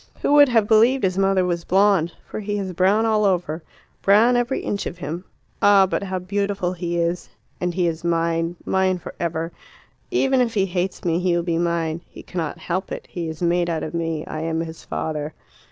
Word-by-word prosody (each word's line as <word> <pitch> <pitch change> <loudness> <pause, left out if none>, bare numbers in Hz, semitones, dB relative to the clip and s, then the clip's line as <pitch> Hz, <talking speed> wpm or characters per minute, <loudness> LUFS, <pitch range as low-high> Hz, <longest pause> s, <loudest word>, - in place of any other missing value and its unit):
"Who - - +3
would 290 -2 +7
have 225 -4 +3
believed 230 +5 +4
his 185 0 +1
mother 195 -1 +3
was 170 -1 -1
blonde? 190 -3 +3 0.2
For - - -5
he 205 0 -2
is 190 -2 -3
brown 195 +5 +3
all 215 -1 +2
over 175 -5 0 0.4
brown 220 +5 +5
every 245 +2 0
inch 200 - -2
of 175 - -6
him. 175 +2 -5 0.4
Ah, 200 -1 +6
but 190 - -2
how 190 -1 -3
beautiful 195 0 -1
he 175 -1 -3
is! 170 +1 -1 0.3
And 180 0 0
he 180 -2 +1
is 165 -1 -2
mine; 165 0 0
mine 190 -1 +2
for 175 - -9
ever. 165 0 -2 0.6
Even 270 -8 +2
if 230 -2 0
he 195 -2 +3
hates 180 0 -3
me 170 0 +2
he 180 -1 +1
will 170 - 0
be 170 -1 0
mine. 170 -1 -1
He - - -12
cannot 165 -4 -4
help 185 +2 -3
it; - - -5
he 170 -2 -4
is 160 +2 -6
made 175 0 +2
out 160 -2 -1
of 155 - -5
me; 165 -2 -2
I 155 - -5
am 160 0 -1
his 165 -1 -7
father." 155 -1 -4
180 Hz, 210 wpm, -22 LUFS, 170-200 Hz, 0.6 s, would